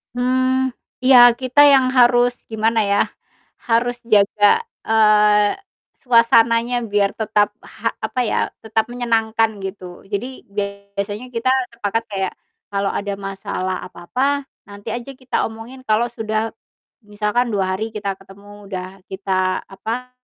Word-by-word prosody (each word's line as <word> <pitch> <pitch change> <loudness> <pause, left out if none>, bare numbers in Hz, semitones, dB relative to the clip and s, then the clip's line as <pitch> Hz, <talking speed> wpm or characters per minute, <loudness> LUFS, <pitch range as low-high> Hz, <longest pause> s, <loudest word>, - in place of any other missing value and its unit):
Hmm, 255 +1 +1 0.3
iya, 260 0 +7 0.2
kita 255 +2 0
yang 265 -1 +5
harus, 245 0 +5 0.2
gimana 225 +1 +1
ya, 200 - +3 0.7
harus 240 +1 +2 0.2
jaga, 205 0 +3 0.4
eee, 210 -1 +4 0.5
suasananya 230 0 +4
biar 200 -1 +2
tetap 210 -2 +1
ha - - -4 0.2
apa 255 - -3
ya, - - 0 0.3
tetap 220 0 0
menyenangkan 225 -2 +1
gitu. 190 0 -6 0.3
Jadi 205 +4 -1 0.7
biasanya 205 +4 -4
kita 240 +1 0 0.2
sepakat 225 -1 -2
kayak, 190 -2 -2 0.4
kalo 200 0 0
ada 200 0 -3
masalah 195 -1 -4
apa-apa 265 +11 -2 0.2
nanti 200 0 -7
aja 245 +3 -6
kita 255 -1 -1
omongin 225 +4 -11
kalo 215 +2 +3
sudah 220 -1 -2 0.5
misalkan 210 +3 -1
2 195 -4 0
hari 220 +2 -2
kita 205 -2 -2
ketemu, 200 +1 -15
udah 185 -2 -4 0.2
kita, 190 -1 -1
apa, 230 +6 -6
220 Hz, 125 wpm, -20 LUFS, 200-245 Hz, 0.7 s, iya